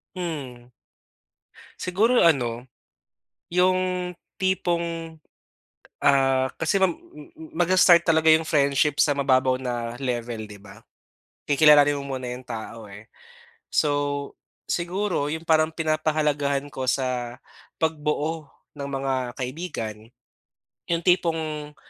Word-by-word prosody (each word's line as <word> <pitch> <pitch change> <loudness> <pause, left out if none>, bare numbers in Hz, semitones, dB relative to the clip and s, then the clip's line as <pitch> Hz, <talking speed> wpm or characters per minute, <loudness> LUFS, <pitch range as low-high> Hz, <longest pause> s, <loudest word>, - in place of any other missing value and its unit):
Hmm. 135 -9 -6 1.1
Siguro 215 +7 +2
ano, 125 -6 +2 0.9
'yong 185 0 +1 0.2
tipong, 170 -3 -1 0.9
ah, 135 -2 +3
kasi 165 +5 0
ma 190 - +5
hmm 160 -1 -11
magsa-start 175 0 +5
talaga 160 -1 +4
'yong 160 0 +2
friendship 140 0 +2
sa 145 - +3
mababaw 130 -2 +2
na 120 -2 -3
level, 120 -4 -3
'di 105 - -10
ba? 100 +1 -15 0.7
Kikilalanin 145 0 +6
mo 140 -2 -4
muna 130 - -6
'yong 125 +1 -6
tao, 115 -2 -8
eh. 105 +3 -12 0.6
So 145 -1 0 0.3
siguro 175 -3 -1
'yong 160 +2 -5
parang 155 -1 +3
pinapahalagahan 155 -3 0
ko 130 -1 -2
sa 125 -2 -2 0.4
pagbuo 155 0 -2 0.2
ng 140 -1 -6
mga 135 -1 -2 0.2
kaibigan, 125 -6 -5 0.8
'yong 170 0 -1
tipong, 160 -4 0
145 Hz, 105 wpm, -24 LUFS, 130-165 Hz, 1.1 s, Kikilalanin